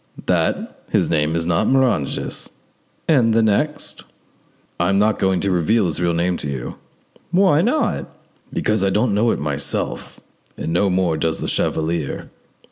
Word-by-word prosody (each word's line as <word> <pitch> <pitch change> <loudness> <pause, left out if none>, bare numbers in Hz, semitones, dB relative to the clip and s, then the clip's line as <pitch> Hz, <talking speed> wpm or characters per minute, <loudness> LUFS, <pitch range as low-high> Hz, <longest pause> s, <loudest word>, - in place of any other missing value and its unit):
"That - - -1
his - - +1
name 75 0 +1
is 85 0 0
not 85 -1 +1
Moranges." 130 - 0 0.6
"And 120 -8 +4
the 115 - +4
next?" 110 +9 0 0.8
"I 85 +1 +2
am 100 - +2
not 105 +2 +2
going 95 -1 +2
to 100 - 0
reveal 95 +5 +2
his 85 -1 -2
real 85 -1 +2
name 85 +1 0
to 75 - -3
you." 65 -3 -4 0.6
"Why 180 -4 +4
not?" 250 - 0 0.4
"Because 105 -2 0
I 95 - +3
don't 105 +3 +1
know 110 +3 +2
it - - +1
myself, 70 -1 -3 0.4
and 80 - -3
no 95 +3 +2
more 90 -3 +1
does 80 0 -1
the - - -3
chevalier." 80 -2 -2
95 Hz, 160 wpm, -20 LUFS, 80-115 Hz, 0.8 s, And